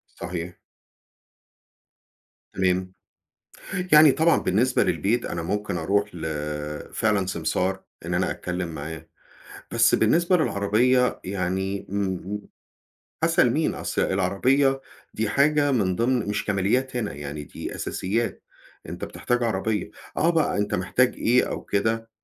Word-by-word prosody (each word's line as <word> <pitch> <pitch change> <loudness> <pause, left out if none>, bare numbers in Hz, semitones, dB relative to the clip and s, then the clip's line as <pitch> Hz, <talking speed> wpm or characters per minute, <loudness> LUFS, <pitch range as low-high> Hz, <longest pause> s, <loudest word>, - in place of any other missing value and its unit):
صحيح. 90 0 -5 2.0
تمام. 95 -1 0 1.0
يعني 150 -1 +9
طبعًا 160 +4 +3
بالنسبة 120 +7 +2
للبيت 120 +4 0
أنا 85 - -3
ممكن 105 +5 -2
أرُوح 100 0 0
ل 85 - -8 0.7
فعلًا 105 -3 +1
سمسار 90 +2 -1 0.2
إن - - -2
أنا - - +1
أتكلّم 90 0 -3
معاه، 80 +1 -7 0.7
بس - - +4
بالنسبة 175 +2 +3
للعربية 125 - +2
يعني، 95 +1 -2
امم 100 0 0
امم 105 +3 -5 0.8
أسأل - - +4
مين؟ - - 0
أصل - - -2
العربية 130 +9 +2 0.3
دي 110 -1 -1
حاجة 145 +3 +3
من 95 -7 +1
ضِمن 120 -2 +1
مش 105 - -1
كماليات 110 +7 0
هنا، 110 -4 -2
يعني 75 +1 -6
دي - - -7
أساسيات، 115 +5 -2 0.5
أنت - - -5
بتحتاج 120 0 -2
عربية، 110 -2 -1 0.3
آه 165 - +3
بقى 160 -10 +1
أنت 105 - 0
محتاج 120 +8 +2
إيه 125 +2 +3
أو - - -5
كده 115 +2 -1
105 Hz, 125 wpm, -25 LUFS, 95-125 Hz, 2.0 s, يعني